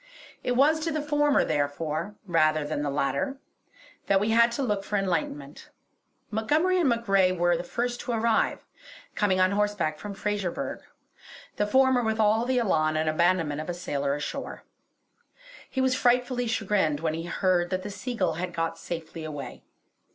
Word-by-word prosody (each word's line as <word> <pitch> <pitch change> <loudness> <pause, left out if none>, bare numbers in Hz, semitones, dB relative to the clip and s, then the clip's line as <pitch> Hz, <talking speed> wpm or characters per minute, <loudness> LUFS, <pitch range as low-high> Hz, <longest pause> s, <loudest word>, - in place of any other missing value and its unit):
It 250 - 0
was 290 +5 +4
to 325 +1 -2
the 305 - -1
former, 295 -1 +2
therefore, 155 +6 -2
rather 155 -4 +2
than 145 -1 -2
the 145 - -1
latter, 140 - -1 0.7
that 195 -1 +4
we 210 +3 0
had 235 +1 +5
to 275 - -2
look 205 -5 -1
for 205 - -2
enlightenment. 150 -7 -3 0.6
Montgomery 305 +13 +2
and 320 -6 +3
MacRae 195 -6 +3
were 175 -1 +2
the 170 - -3
first 240 +6 -2
to 250 - -4
arrive, 230 -1 +1 0.5
coming 190 -3 +1
on 185 +1 +4
horseback 205 -7 0
from 205 -1 -7
Fraserburgh, 205 -3 -3 0.8
the 210 - +1
former 260 +2 +4
with 220 -1 -1
all 220 +2 +3
the 255 0 +1
elan 155 -9 +2
and 155 0 0
abandonment 160 -2 +1
of 155 - -7
a 175 - -2
sailor 140 -5 -2
ashore. 145 - -5 1.1
He 265 - -1
was 260 -1 +2
frightfully 245 0 +1
chagrined 205 -9 0
when 160 -1 0
he 165 +1 -4
heard 175 -1 +1
that 185 0 -2
the 205 - -5
Seagull 195 -5 -2
had 180 -1 -4
got 165 0 -2
safely 165 -1 -6
away. 145 -3 -7
195 Hz, 165 wpm, -27 LUFS, 165-235 Hz, 1.1 s, had